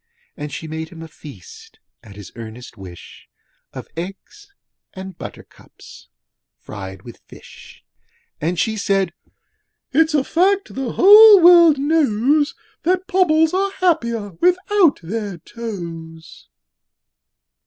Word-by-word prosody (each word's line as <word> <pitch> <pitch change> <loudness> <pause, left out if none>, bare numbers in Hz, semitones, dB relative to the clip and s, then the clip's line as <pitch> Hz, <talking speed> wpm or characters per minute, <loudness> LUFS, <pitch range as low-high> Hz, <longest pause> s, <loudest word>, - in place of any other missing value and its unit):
And 150 -2 -7
she 160 - -7
made 160 +1 -6
him 165 -1 -11
a - - -10
feast 445 - -15 0.2
at 100 -3 -15
his 105 -2 -12
earnest 115 +2 -11
wish 95 -4 -14 0.4
Of - - -10
eggs 195 - -10 0.4
and 190 -1 -9
buttercups - - -14 0.5
fried 95 -1 -10
with 120 - -13
fish; - - -16 0.6
And 170 +4 -2
she 220 -1 -1
said, 195 -3 -1 0.8
'It's 315 +2 +2
a 285 - +2
fact 385 +7 0
the 260 -3 -5
whole 415 +1 +8
world 340 -3 +6
knows, 290 -1 +1 0.3
'That 365 +2 -1
Pobbles 320 -4 +2
are 390 +1 -1
happier 235 - -1
without 365 -2 +2
their 200 +1 -5
toes.' 165 -6 -10
235 Hz, 115 wpm, -19 LUFS, -, 0.8 s, whole